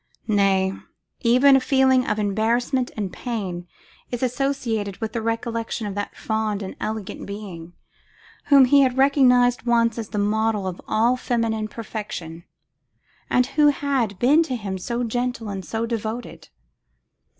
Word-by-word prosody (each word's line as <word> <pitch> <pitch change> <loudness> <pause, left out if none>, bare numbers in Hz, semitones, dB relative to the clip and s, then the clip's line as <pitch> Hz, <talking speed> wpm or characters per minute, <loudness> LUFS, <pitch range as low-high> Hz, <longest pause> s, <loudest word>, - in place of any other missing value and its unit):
Nay, 195 -3 +2 0.5
even 255 +3 +5
a - - +5
feeling 265 -1 +3
of 210 - 0
embarrassment 230 +5 0
and 200 -4 -3
pain 190 -8 -4 0.4
is 245 0 -4
associated 245 -6 -1
with 220 -1 -4
the 230 - -2
recollection 230 0 -3
of 205 - -4
that 205 +1 -5
fond 220 -2 -2
and 190 - -7
elegant 215 -2 -5
being, 185 -5 -8 0.7
whom 275 -2 +7
he 280 +2 +5
had 260 -1 +2
recognised 250 -3 +4
once 230 -1 +2
as 220 - -5
the 210 - -5
model 210 0 0
of 185 -1 -5
all 235 +3 +2
feminine 230 -3 -1
perfection, 200 -7 -7 0.8
and 250 - +3
who 295 +3 +3
had 270 -8 0
been 280 - +4
to 275 -6 -2
him 195 -5 -4
so 235 +6 -3
gentle 245 -1 -2
and 195 -1 -5
so 225 +1 -2
devoted. 230 +1 -5
230 Hz, 145 wpm, -23 LUFS, 205-250 Hz, 0.8 s, whom